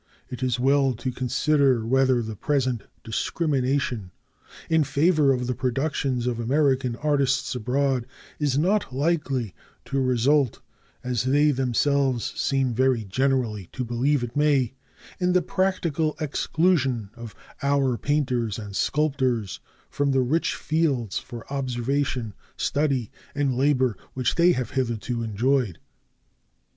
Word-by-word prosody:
It 125 -1 -6
is 125 -2 0
well 135 +1 +3
to 130 +3 -3
consider 130 0 +1
whether 130 0 +3
the 110 -1 -6
present 130 0 -1 0.2
discrimination 130 - -1 0.6
in 160 -1 +3
favor 145 +1 +3
of 125 -2 0
the 125 - -1
productions 130 0 -1
of 120 -2 -1
American 130 0 +1
artists 140 -2 +1
abroad 130 +1 0 0.3
is 145 -3 +1
not 185 +2 +1
likely 135 - -1 0.3
to 135 0 -1
result, 130 +1 +2 0.4
as 125 -2 -1
they 145 +3 +4
themselves 135 -1 +1
seem 135 -3 0
very 130 -1 +2
generally 115 -2 -1
to 130 - -3
believe 125 +4 +1
it 120 -1 -6
may, 145 -5 +2 0.5
in 180 -1 +2
the 180 - +4
practical 170 -5 0
exclusion 145 - 0
of 115 -2 -10 0.3
our 140 -2 +2
painters 125 -6 -1
and 105 -3 -7
sculptors 130 - 0 0.3
from 140 -1 0
the 135 - +3
rich 150 +7 0
fields 140 - 0
for 120 -3 -10
observation, 130 -3 -1 0.2
study, 140 -6 0 0.2
and 140 -3 0
labor 130 -3 +2 0.2
which 130 -1 0
they 175 +1 +4
have 125 -1 -3
hitherto 120 -2 -2
enjoyed. 115 -2 0
130 Hz, 125 wpm, -25 LUFS, 120-145 Hz, 0.6 s, they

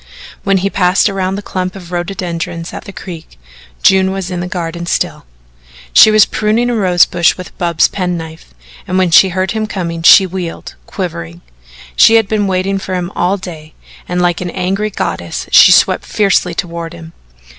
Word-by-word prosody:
When 195 0 +2
he 195 +2 -1
passed 185 +2 +2
around 190 -1 -2
the 205 - -6
clump 185 -1 -4
of 180 -2 -11
rhododendrons 175 -2 -4
at - - -8
the 200 - -9
creek, 170 - -10 0.5
June 190 0 +4
was 190 -1 -5
in 180 - -3
the 180 - -4
garden 170 -2 -5
still. 60 - -2 0.7
She - - +8
was 215 -1 +5
pruning 225 +3 0
a - - -1
rose 180 -5 +3
bush 170 -2 +1
with 185 - -10
Bub's 170 -2 +2
penknife, 165 - -5 0.4
and 185 - -1
when 185 -2 +1
she 190 +4 +6
heard 185 +1 -2
him 220 -1 -2
coming 170 -5 -4
she 190 +3 +7
wheeled, 180 -2 -6
quivering. 85 - -6 0.5
She 225 - +6
had 225 -3 +3
been 205 -1 0
waiting 190 +1 -1
for 185 -1 -5
him 180 0 -3
all 185 +3 0
day, 160 -5 -10 0.3
and, 180 0 -1
like 175 -1 0
an 180 - -4
angry 195 +4 -2
goddess, 205 - -4
she - - +8
swept - - +3
fiercely 195 -4 +1
toward 170 0 -5
him. 165 -1 -12
180 Hz, 180 wpm, -14 LUFS, 170-195 Hz, 0.7 s, She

